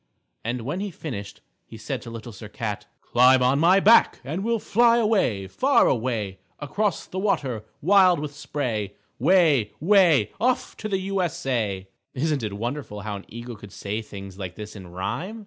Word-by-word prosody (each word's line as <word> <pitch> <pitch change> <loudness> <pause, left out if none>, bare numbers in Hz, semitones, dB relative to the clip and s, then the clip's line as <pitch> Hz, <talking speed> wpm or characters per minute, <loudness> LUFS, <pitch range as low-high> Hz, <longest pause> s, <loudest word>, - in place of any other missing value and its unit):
_" - - -48 0.4
And 120 +2 -2
when 145 +10 -3
he 205 +1 -3
finished 110 - -7 0.2
he 115 - -12
said 125 +4 -4
to 115 - -9
Little 115 +1 -8
Sir 105 0 -10
Cat, 105 -2 -5
"Climb 125 +1 +4
on 130 +3 +3
my 180 +5 +5
back 220 +4 +5
and 160 +9 -4
we'll 230 +1 +1
fly 235 +2 +3
away, 205 - +1
far 270 - +3
away, 110 -6 -1 0.2
across 195 +7 -2
the 185 - -5
water 130 - -1 0.2
wild 185 -1 +5
with 145 -1 -5
spray, 120 -9 -3 0.2
way, 155 - +3
way 170 - +4
off 250 +2 0
to 215 - -5
the 195 - +1
U. 195 0 -1
S. 170 -7 -3
A." 105 -7 -1 0.3
Isn't 150 0 0
it 105 -3 -3
wonderful 115 0 -5
how 105 0 -4
an 100 - -12
eagle 120 +1 -8
could 105 -2 -12
say 105 +4 -4
things 100 -2 -10
like 90 -2 -6
this 105 0 -8
in 95 -3 -10
rhyme? 165 - -4
130 Hz, 185 wpm, -24 LUFS, -, 0.4 s, my